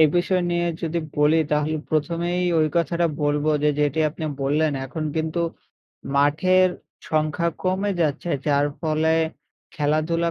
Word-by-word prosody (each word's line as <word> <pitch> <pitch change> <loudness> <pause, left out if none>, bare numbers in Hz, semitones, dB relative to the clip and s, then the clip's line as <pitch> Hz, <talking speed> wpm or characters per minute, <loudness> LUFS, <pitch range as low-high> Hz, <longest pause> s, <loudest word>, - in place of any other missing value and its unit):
এ - - +8
বিষয় 180 +1 +2
নিয়ে 175 0 +1 0.2
যদি 170 0 -1 0.2
বলি 150 +2 +4
তাহলে 150 +1 +1
প্রথমেই 170 +3 0 0.2
ওই 155 - +3
কথাটা 170 +1 +1 0.2
বলব 145 0 +1 0.2
যে, 150 - +4
যেটি 145 +1 +1
আপনি 160 +1 -7 0.2
বললেন 150 +2 +1
এখন 155 +4 -5
কিন্তু 160 +2 -1 0.8
মাঠের 185 +6 +4 0.4
সংখ্যা 155 +2 +1
কমে 190 +2 0
যাচ্ছে। 160 +2 0 0.2
যার 145 0 +3
ফলে 160 0 +1 0.6
খেলাধুলা 155 +3 0
160 Hz, 135 wpm, -23 LUFS, 150-170 Hz, 0.8 s, এ